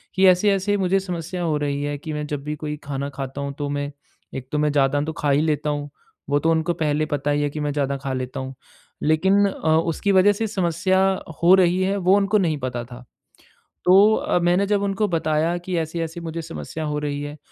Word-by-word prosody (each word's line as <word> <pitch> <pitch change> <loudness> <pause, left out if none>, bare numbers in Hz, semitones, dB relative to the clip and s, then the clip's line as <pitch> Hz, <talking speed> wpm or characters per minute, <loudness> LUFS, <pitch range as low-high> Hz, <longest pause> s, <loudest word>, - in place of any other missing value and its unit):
कि 190 +1 +4
ऐसे-ऐसे 195 +2 +3
मुझे 195 0 +2
समस्या 175 -1 -5
हो 155 -3 0
रही 145 -1 -2
है 145 0 -2
कि 155 +2 -6
मैं 150 0 -3
जब 145 -2 -4
भी 150 +1 -3
कोई 150 0 -5
खाना 140 0 -4
खाता 135 0 -6
हूँ 140 0 -4
तो 145 -1 -3
मैं 145 0 -3 0.4
एक 130 -1 -6
तो 150 - -1
मैं 150 0 +2
ज़्यादा 145 0 +2
तो 155 +2 -3
खा 145 - -1
ही 140 +2 +3
लेता 150 -1 0
हूँ। 145 0 -3 0.4
वो 145 - +2
तो 165 +3 +2
उनको 165 +1 +1
पहले 155 -2 0
पता 145 0 0
ही 145 0 +1
है 145 - 0
कि 150 - -6
मैं 150 0 -1
ज़्यादा 140 -1 -1
खा 135 0 -4
लेता 130 0 -4
हूँ। 130 0 -5 0.5
लेकिन 190 +6 +3
अ, 190 - -5
उसकी 165 +4 0
वज़ह 190 +2 +5
से 220 +2 -2
समस्या 185 -1 +1 0.4
हो 180 +2 +7
रही 185 0 +3
है 195 +1 +1
वो 185 +1 +4
उनको 205 +1 +2
नहीं 165 -6 +1
पता 125 -3 -4
था। 125 +1 -11 0.8
तो 195 +4 +6
अ, 180 - 0
मैंने 175 +3 +2
जब 205 -1 +1
उनको 200 +1 0
बताया 165 -1 0
कि 175 0 -4
ऐसी-ऐसी 165 +1 -4
मुझे 165 0 -5
समस्या 80 - -6
हो 150 0 -2
रही 145 -1 -3
है, 145 +1 -6
155 Hz, 225 wpm, -22 LUFS, 145-185 Hz, 0.8 s, हो